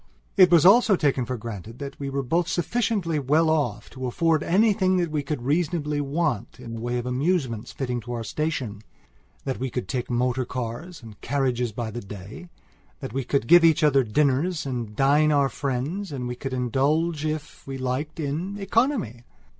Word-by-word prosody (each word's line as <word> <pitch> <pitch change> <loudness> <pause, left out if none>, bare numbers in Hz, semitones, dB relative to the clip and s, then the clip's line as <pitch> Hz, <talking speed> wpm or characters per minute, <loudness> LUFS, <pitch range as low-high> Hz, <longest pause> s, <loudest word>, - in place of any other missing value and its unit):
It 185 -2 +7
was 170 -3 +5
also 215 +1 +7
taken 140 -6 +1
for 125 0 -3
granted 115 0 -8
that 140 +1 -7
we 140 -1 -3
were 135 0 -2
both 170 +7 +1
sufficiently 175 -3 0
well 155 +4 +3
off 155 -2 -1
to 130 -1 -5
afford 160 +5 +1
anything 190 0 +3
that 170 -3 0
we 150 -1 0
could 140 -3 -4
reasonably 150 0 0
want 140 -7 -2
in 115 -2 -8
the 115 - -5
way 120 +1 -1
of 120 - -3
amusements 130 - -1
fitting 125 -3 -3
to 120 +2 -6
our 115 -1 -3
stationthat 110 - -5
we 130 +1 -2
could 125 +1 -4
take 125 -3 -3
motor 125 +1 +1
cars 125 +6 -6
and 110 -3 -12
carriages 125 -3 0
by 110 +1 -4
the 120 +2 -5
day; 100 - -10 0.5
that - - -7
we 135 +1 -1
could 140 0 0
give 175 +7 +7
each 160 -1 +4
other 140 -3 +5
dinners 145 +8 +1
and 120 -5 -4
dine 145 +4 +4
our 140 -2 +3
friends 145 +10 -3
and 130 -3 -4
we 125 - -3
could 135 +2 -5
indulge 145 +6 0
if 155 -1 -5
we 135 0 -4
liked 135 +5 -3
in 165 +7 -3
economy. 205 - 0
140 Hz, 185 wpm, -25 LUFS, 125-165 Hz, 0.5 s, It